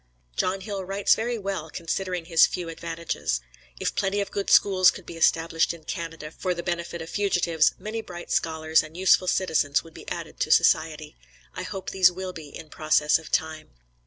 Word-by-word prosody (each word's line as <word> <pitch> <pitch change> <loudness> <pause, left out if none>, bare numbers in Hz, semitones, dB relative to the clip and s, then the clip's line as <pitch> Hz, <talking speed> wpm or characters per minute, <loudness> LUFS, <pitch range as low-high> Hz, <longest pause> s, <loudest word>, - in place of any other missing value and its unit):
John 190 - 0
Hill 195 -1 -4
writes 195 +2 +2
very 235 +2 -1
well, 195 -6 -4
considering 180 +1 -3
his 165 -1 +5
few 175 -2 -5
advantages. 165 - -3 0.4
If - - -1
plenty 200 0 0
of 200 - -3
good 200 - -3
schools 185 -2 +6
could 185 - -6
be 170 - -9
established 165 0 +2
in 165 - -16
Canada 165 -3 -6
for 180 +2 -2
the 170 - -5
benefit 170 -1 -3
of 160 - -10
fugitives, 175 -6 +2
many 220 +1 -5
bright 175 -4 -9
scholars 160 -1 +2
and 155 +2 -11
useful 185 0 +4
citizens 160 -6 +1
would 165 - -15
be - - -10
added - - -6
to - - 0
society. - - +2 0.4
I - - -5
hope 190 - -5
these 185 -2 +5
will 185 +1 -6
be 155 -4 -9
in 155 +2 -10
process 155 0 +2
of 160 - -12
time. 155 - -2
170 Hz, 190 wpm, -25 LUFS, 160-190 Hz, 0.4 s, schools